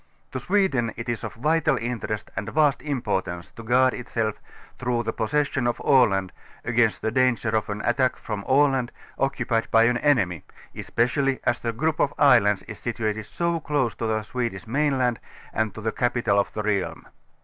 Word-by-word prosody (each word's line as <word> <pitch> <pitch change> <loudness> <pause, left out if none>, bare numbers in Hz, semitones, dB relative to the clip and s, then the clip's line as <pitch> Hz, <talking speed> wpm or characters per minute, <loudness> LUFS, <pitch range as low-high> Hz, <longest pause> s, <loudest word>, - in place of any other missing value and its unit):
To 130 - -3
Sweden 135 - +1
it 115 +1 -6
is 120 -1 -3
of - - -6
vital 155 +6 +2
interest 115 -2 -4
and 100 +3 -3
vast 145 +1 +2
importance 95 - -3
to - - -11
guard 125 +3 +3
itself 115 -3 -3 0.4
through 120 -1 0
the 115 0 -2
j)ossession 135 +1 0
of 120 - -3
Aland 100 -9 +3 0.3
against 115 -2 +1
the 110 - 0
danger 125 -2 +2
of 110 -1 0
an 105 0 -4
attack 125 +1 +2
from 105 -2 -5
Aland, 135 -3 +3 0.3
occupied 130 -4 0
by 115 0 +5
an 120 +1 +3
enemy, 100 - +2 0.3
especially 135 +3 0
as 120 - +1
the 115 - -2
group 155 +7 -1
of 145 - +1
islands 115 -8 +5
is 105 - -9
situated 110 -2 -3
so 170 +4 -1
close 140 -7 0
to 115 - -3
the 110 -1 0
Swedish 115 -4 -4
mainland 130 -1 +1 0.3
and 110 -1 -1
to 110 - -7
the 110 +1 -1
capital 120 -5 +1
of 100 - 0
the 105 - -3
realm. 100 -3 -1
120 Hz, 175 wpm, -24 LUFS, 110-135 Hz, 0.4 s, by